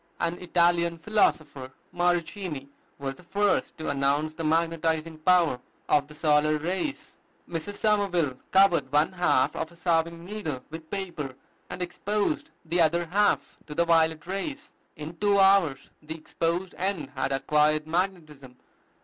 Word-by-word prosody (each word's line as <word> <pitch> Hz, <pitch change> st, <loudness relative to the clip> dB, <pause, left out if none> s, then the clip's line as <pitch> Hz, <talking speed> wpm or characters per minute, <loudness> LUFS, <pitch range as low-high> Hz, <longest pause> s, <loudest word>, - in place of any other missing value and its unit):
An 170 Hz, +1 st, -1 dB
Italian 170 Hz, -1 st, +2 dB
philosopher, 155 Hz, -8 st, 0 dB, 0.2 s
Morichini, 175 Hz, -4 st, -1 dB, 0.3 s
was 135 Hz, -1 st, -5 dB
the -, -, -14 dB
first 200 Hz, +3 st, 0 dB
to 155 Hz, -2 st, -2 dB
announce 140 Hz, +3 st, 0 dB
the 165 Hz, -, -6 dB
magnetizing 160 Hz, 0 st, 0 dB
power 170 Hz, -5 st, +3 dB, 0.3 s
of 145 Hz, -1 st, +3 dB
the 150 Hz, -, -13 dB
solar 150 Hz, 0 st, +3 dB
rays. 190 Hz, -, -4 dB, 0.3 s
Mrs. 170 Hz, +4 st, -5 dB
Somerville 195 Hz, -11 st, +1 dB
covered 190 Hz, -8 st, +4 dB
one 150 Hz, +4 st, +3 dB
half 175 Hz, -8 st, +2 dB
of 160 Hz, -, -4 dB
a -, -, -16 dB
sewing 170 Hz, -1 st, 0 dB
needle 175 Hz, -10 st, -5 dB
with 160 Hz, 0 st, -9 dB
paper, 170 Hz, -9 st, -5 dB, 0.3 s
and 180 Hz, -, -4 dB
exposed 205 Hz, 0 st, -2 dB, 0.2 s
the 170 Hz, +2 st, +1 dB
other 170 Hz, +2 st, +2 dB
half 200 Hz, +5 st, +1 dB
to 150 Hz, -, -7 dB
the 170 Hz, -, +2 dB
violet 160 Hz, -2 st, +2 dB
rays. 280 Hz, -, -5 dB, 0.2 s
In 155 Hz, +3 st, -8 dB
two 205 Hz, -1 st, +2 dB
hours 190 Hz, -8 st, +3 dB
the 160 Hz, +1 st, -7 dB
exposed 170 Hz, +3 st, -2 dB
end 180 Hz, -7 st, -2 dB
had 135 Hz, -1 st, -2 dB
acquired 150 Hz, +2 st, +2 dB
magnetism. 160 Hz, -7 st, -3 dB
165 Hz, 140 wpm, -27 LUFS, 150-180 Hz, 0.3 s, covered